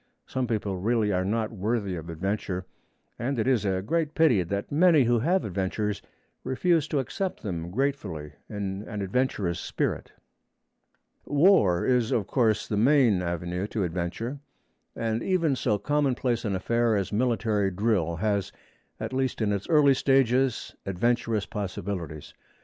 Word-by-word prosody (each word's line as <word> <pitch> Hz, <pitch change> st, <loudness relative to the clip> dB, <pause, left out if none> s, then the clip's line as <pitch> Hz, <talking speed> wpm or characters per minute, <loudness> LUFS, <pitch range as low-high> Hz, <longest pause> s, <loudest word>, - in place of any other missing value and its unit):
Some 130 Hz, -1 st, -2 dB
people 105 Hz, -4 st, -2 dB
really 110 Hz, +1 st, +1 dB
are 90 Hz, -1 st, +1 dB
not 110 Hz, +3 st, -1 dB
worthy 105 Hz, -2 st, -1 dB
of 85 Hz, 0 st, -7 dB
adventure, 95 Hz, +2 st, -3 dB, 0.5 s
and 130 Hz, +3 st, -1 dB
it 110 Hz, -, 0 dB
is 125 Hz, -5 st, +2 dB
a 95 Hz, -1 st, 0 dB
great 155 Hz, +6 st, -1 dB
pity 155 Hz, -, +4 dB
that 100 Hz, +4 st, -3 dB
many 160 Hz, -1 st, +5 dB
who 120 Hz, 0 st, +2 dB
have 180 Hz, +10 st, +1 dB
adventures 100 Hz, +2 st, -2 dB, 0.4 s
refuse 155 Hz, +4 st, +1 dB
to 150 Hz, -, -1 dB
accept 185 Hz, -, -3 dB
them 85 Hz, -5 st, -4 dB
gratefully 95 Hz, -, -2 dB, 0.2 s
in 100 Hz, -2 st, -4 dB
an 105 Hz, -2 st, -4 dB
adventurous 100 Hz, -5 st, -1 dB
spirit. -, -, -2 dB, 1.1 s
War 145 Hz, -, +4 dB
is, 125 Hz, -1 st, +2 dB
of 115 Hz, -6 st, +1 dB
course, 110 Hz, -2 st, +1 dB
the 105 Hz, -, -1 dB
main 120 Hz, -5 st, +4 dB
avenue 90 Hz, +2 st, -3 dB
to 105 Hz, -1 st, -2 dB
adventure, 90 Hz, -, -3 dB, 0.6 s
and 115 Hz, 0 st, -1 dB
even 170 Hz, -7 st, +1 dB
so 105 Hz, -4 st, +1 dB
commonplace 125 Hz, -1 st, 0 dB
an 100 Hz, -2 st, 0 dB
affair 115 Hz, +3 st, +1 dB
as 100 Hz, 0 st, -2 dB
military 110 Hz, -3 st, +1 dB
drill 95 Hz, -4 st, 0 dB
has, 100 Hz, +1 st, -1 dB, 0.5 s
at -, -, -4 dB
least 130 Hz, -1 st, -1 dB
in 110 Hz, -2 st, +1 dB
its 100 Hz, 0 st, -4 dB
early 150 Hz, -3 st, +6 dB
stages, 135 Hz, -1 st, +2 dB
adventurous 115 Hz, +2 st, 0 dB
possibilities. 90 Hz, -6 st, -5 dB
110 Hz, 145 wpm, -27 LUFS, 95-130 Hz, 1.1 s, early